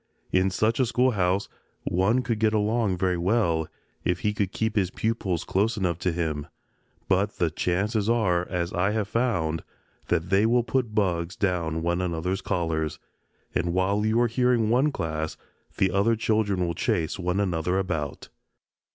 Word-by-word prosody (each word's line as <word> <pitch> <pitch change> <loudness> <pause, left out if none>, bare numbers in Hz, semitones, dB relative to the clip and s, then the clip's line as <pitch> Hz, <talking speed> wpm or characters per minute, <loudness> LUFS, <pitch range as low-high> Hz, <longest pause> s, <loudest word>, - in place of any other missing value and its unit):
In 95 +1 +3
such 110 +6 +1
a 130 - +3
schoolhouse 105 -6 +1 0.4
one 105 +8 +2
could 115 -4 -1
get 110 0 +2
along 105 -2 +1
very 90 -1 0
well, 85 -5 +1 0.4
if 90 0 0
he 105 - +1
could 100 -2 -1
keep 110 +1 -1
his 95 -4 +2
pupils 100 -5 -1
close 105 +4 0
enough 90 -4 -1
to 90 - 0
him, 80 -3 -2 0.6
but 100 +2 +1
the 85 -4 +1
chances 100 +6 0
are, 90 -7 +2
as 85 -1 -2
I 95 +3 +1
have 110 -2 -1
found, 90 -10 0 0.4
that 85 +3 0
they 100 +3 +4
will 120 +1 +3
put 120 -2 -1
bugs 90 -4 0
down 85 -4 -1
one 85 +1 0
another's 90 +2 -2
collars, 80 -6 -1 0.6
and 85 0 0
while 100 +3 +1
you 110 +2 +2
are 120 - +4
hearing 120 -1 +2
one 135 +5 +3
class 80 - -3 0.4
the 95 -1 +2
other 100 +5 +3
children 105 -4 +1
will 85 - -1
chase 80 +1 -1
one 90 +2 0
another 90 -2 0
about. 80 -7 -3
95 Hz, 165 wpm, -26 LUFS, 85-110 Hz, 0.6 s, they